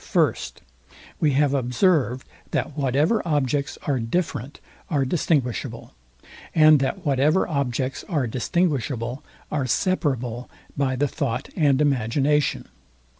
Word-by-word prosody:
First, - - 0 0.6
We 150 -3 +2
have 140 0 +2
observed, 130 - +1 0.2
that 145 - -2
whatever 145 - +2
objects 145 -3 0
are 140 -3 0
different 140 +1 -3 0.3
are 140 -4 +1
distinguishable, 130 - -1 0.6
and 155 -2 +7
that 150 +8 -2
whatever 145 +5 +2
objects 135 -2 -2
are 150 -8 +1
distinguishable 130 -1 -1 0.3
are 140 -4 -1
separable 125 - -1 0.3
by 135 -2 0
the 145 +3 +1
thought 125 -1 -3
and 145 -5 +3
imagination. 140 +1 +1
140 Hz, 110 wpm, -24 LUFS, 130-150 Hz, 0.6 s, and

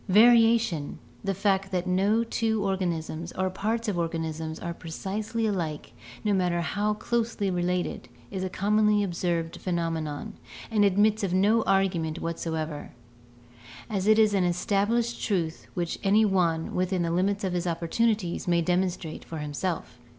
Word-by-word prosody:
Variation, 225 -6 +5 0.3
the 195 - -1
fact 195 0 +1
that 180 -1 -1
no 195 +5 +2
two 225 -2 0
organisms 170 -4 -2
or 185 0 -1
parts 225 +5 -2
of 195 -5 -1
organisms 160 -1 -3
are 170 - -4
precisely 210 +7 -3
alike, 170 -8 -3 0.3
no 210 - +2
matter 180 -2 +1
how 205 +7 0
closely 225 -3 -1
related, 180 0 -2 0.2
is 190 -2 -3
a 185 - -2
commonly 210 +2 +2
observed 170 -3 -2
phenomenon, 165 +1 -2 0.4
and 210 -2 +3
admits 205 +2 +3
of 185 -2 0
no 210 +4 +4
argument 180 -5 +1
whatsoever, 160 -2 -4 1.0
as 195 -1 -1
it 215 0 +6
is 215 -2 +5
an 195 -2 +2
established 205 +6 0
truth 170 -6 -1
which 170 -2 -2
any 210 +2 +4
one, 170 -5 +1
within 185 0 0
the 165 - -1
limits 195 +4 +1
of 185 -2 -1
his 180 0 -1
opportunities, 175 +3 0
may 175 -1 +3
demonstrate 180 -2 -1
for 165 - -7
himself. 150 -2 -4
185 Hz, 145 wpm, -27 LUFS, 170-210 Hz, 1.0 s, it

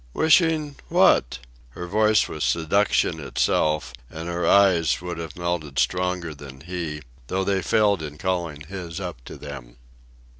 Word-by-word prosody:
"Wishing? 160 -2 +3
what?" - - +4 0.4
Her 90 - -5
voice 105 +3 +3
was - - -5
seduction 85 +5 +1
itself, 75 -5 0 0.2
and 80 +3 -7
her 85 -1 -1
eyes 95 -5 +4
would 90 -1 -6
have 80 -2 -7
melted 85 -5 -3
stronger 90 -2 0
than 70 -2 -12
he, 80 -3 -5 0.2
though 95 +6 -1
they 95 0 0
failed 105 -3 +2
in 75 -1 -7
calling 85 -4 -2
his 85 +1 -7
up 90 -10 -6
to - - -9
them. 70 -5 -9
85 Hz, 145 wpm, -24 LUFS, 75-95 Hz, 0.4 s, what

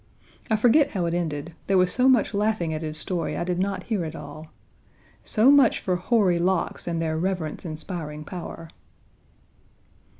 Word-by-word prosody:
I 220 - +3
forget 260 +7 +4
how 185 -4 -1
it 170 - -1
ended. 165 -2 -3
There 195 - +3
was 180 -1 +3
so 255 +1 +4
much 245 -4 +3
laughing 205 -5 0
at 155 - -4
his 155 -1 -4
story 175 +1 -2
I - - -1
did 180 0 -2
not 195 +1 -1
hear 215 -6 -2
it 160 0 -6
all. 155 -1 -9 0.8
So 235 +5 +4
much 280 -5 +5
for 185 - -1
hoary 180 -2 +2
locks 185 0 -1
and 170 -1 -1
their 160 -1 -1
reverence 180 -2 -3
inspiring 155 -1 -6
power! 170 -1 -8
180 Hz, 170 wpm, -25 LUFS, 165-210 Hz, 0.8 s, much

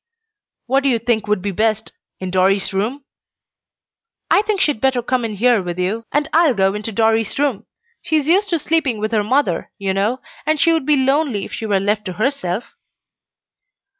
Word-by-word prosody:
"What 270 +2 +2
do 280 - +1
you 240 - +2
think 225 -2 -1
would 210 -3 0
be 200 - -1
best? 215 +2 -1 0.3
In 185 -1 -5
Dorry's 190 +2 +2
room?" 235 +9 -2 1.3
"I 400 - +5
think 425 -2 -1
she'd 295 - +1
better 265 -2 +1
come 250 0 0
in 220 -2 -3
here 235 +1 +3
with 175 -1 -5
you, 200 +6 -2
and 295 0 +1
I'll 320 -5 +4
go 195 -1 +2
into 210 +2 -4
Dorry's 225 0 +1
room. 275 -7 -1 0.3
She 315 - -1
is 300 -3 +2
used 390 +5 +3
to 340 - +1
sleeping 305 -6 0
with 215 +1 -2
her 215 -2 +1
mother, 215 -6 0
you 195 -1 -2
know, 210 +6 0 0.2
and 310 -1 0
she 330 +3 +4
would 320 -4 -1
be 300 -1 +4
lonely 265 -5 +1
if - - -11
she 220 - -4
were 200 -2 +2
left 205 +2 -1
to 185 - -4
herself." 215 -2 -2
225 Hz, 195 wpm, -19 LUFS, 205-280 Hz, 1.3 s, I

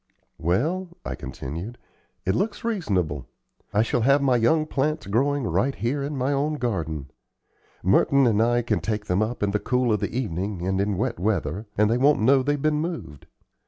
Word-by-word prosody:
"Well," 160 - -1
I - - -3
continued, 85 - -6 0.5
"it 95 - +2
looks 205 - -1
reasonable. 95 - -1 0.4
I 105 - +3
shall 115 +1 0
have 140 +5 +4
my 135 -3 +3
young 155 +7 +3
plants 155 +1 -1
growing 135 +7 +1
right 135 +3 0
here 135 +5 -1
in 140 +1 -3
my 130 +2 0
own 145 +2 0
garden. 80 - -3 0.7
Merton 135 +8 +4
and 110 -3 +3
I 120 +1 +2
can 120 - 0
take 105 -1 -3
them 90 +1 +1
up 110 +1 -2
in 100 - +1
the 105 - 0
cool 125 -1 +1
of 105 - +1
the - - -2
evening 100 -6 -3
and 95 0 +1
in 100 -1 0
wet 115 0 -1
weather, 100 +1 -1
and 105 +1 +4
they 115 +3 +1
won't 145 +3 +4
know 130 +4 +5
they've 145 +2 0
been 150 +1 +1
moved. 160 - -6
120 Hz, 190 wpm, -25 LUFS, 100-140 Hz, 0.7 s, know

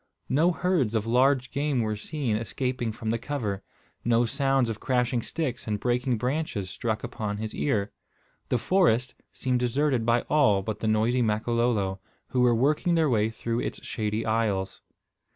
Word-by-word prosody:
No 160 +6 +3
herds 165 - 0
of 110 -1 0
large 125 +2 +3
game 140 -3 0
were 110 -1 -1
seen 120 +1 -2
escaping 120 +1 -2
from 110 0 -3
the 115 - -1
cover. 110 -8 -3 0.4
No 120 0 +3
sounds 135 +1 +1
of 115 -2 -4
crashing 125 -1 +1
sticks 130 -4 -4
and 105 -1 -1
breaking 125 +1 0
branches 125 -6 -2
struck 110 +1 -2
upon 110 -4 -4
his 110 0 -4
ear. 105 -8 0 0.6
The 125 - +2
forest 130 - +2 0.2
seemed 125 -1 -1
deserted 125 +1 +1
by 115 +1 +3
all 105 -10 +3
but 110 +1 -4
the 110 - -2
noisy 110 +4 +2
Makololo, 110 -3 +1 0.3
who 125 - +1
were 120 -1 +5
working 150 +8 +2
their 160 -4 +3
way 110 -1 +2
through 115 +1 -3
its - - -5
shady 110 0 -2
aisles. 110 -4 -1
120 Hz, 165 wpm, -27 LUFS, 110-130 Hz, 0.6 s, were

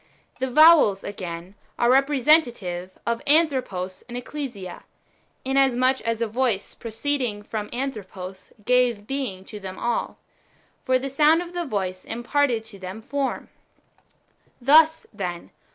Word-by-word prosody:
The 260 0 -1
vowels, 305 -8 +6
again, 180 -2 -6 0.2
are 240 - +2
representative 255 - +2
of 235 0 -1
Anthropos 260 - +1
and 240 - -5
Ecclesia, 245 -8 -6 0.6
inasmuch 265 -1 +2
as 230 0 -1
a - - -1
voice 225 -3 -1
proceeding 230 -2 -3
from 210 0 -5
Anthropos 195 -7 -6 0.2
gave 245 -4 +2
being 215 -8 -4
to 210 - -9
them 190 -1 -8
all; 235 0 -2 0.7
for 255 0 +3
the 265 +2 -4
sound 300 +5 +4
of 350 0 -11
the 350 -1 -2
voice 185 -5 -3
imparted 240 0 0
to 210 -3 -11
them 190 +3 -7
form. 280 +2 -3 1.1
Thus, 310 +5 +5
then. 180 -4 -5
240 Hz, 125 wpm, -24 LUFS, 200-275 Hz, 1.1 s, vowels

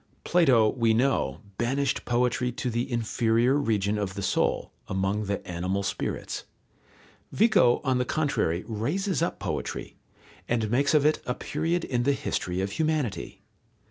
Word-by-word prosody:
Plato, 130 -11 +4
we 115 -1 +2
know, 115 - +1 0.2
banished 135 +2 0
poetry 125 +1 +1
to 125 0 -3
the 120 +4 -2
inferior 115 +1 +2
region 105 -7 +1
of 95 -2 -3
the 100 - -4
soul, - - 0 0.2
among 95 +2 -1
the 100 0 -3
animal 90 +3 -2
spirits. - - -3 0.9
Vico 205 - +4
on 130 -3 +1
the - - +2
contrary 125 - 0
raises 150 - -1
up - - 0
poetry, - - -4 0.5
and 115 -3 0
makes 140 +4 +3
of 150 -1 +4
it 155 - +3
a 125 - -1
period 170 +1 -1
in 120 -2 0
the 140 +3 +2
history 90 -8 -2
of 95 +1 -2
humanity. 155 -5 -2
120 Hz, 145 wpm, -27 LUFS, 105-140 Hz, 0.9 s, Plato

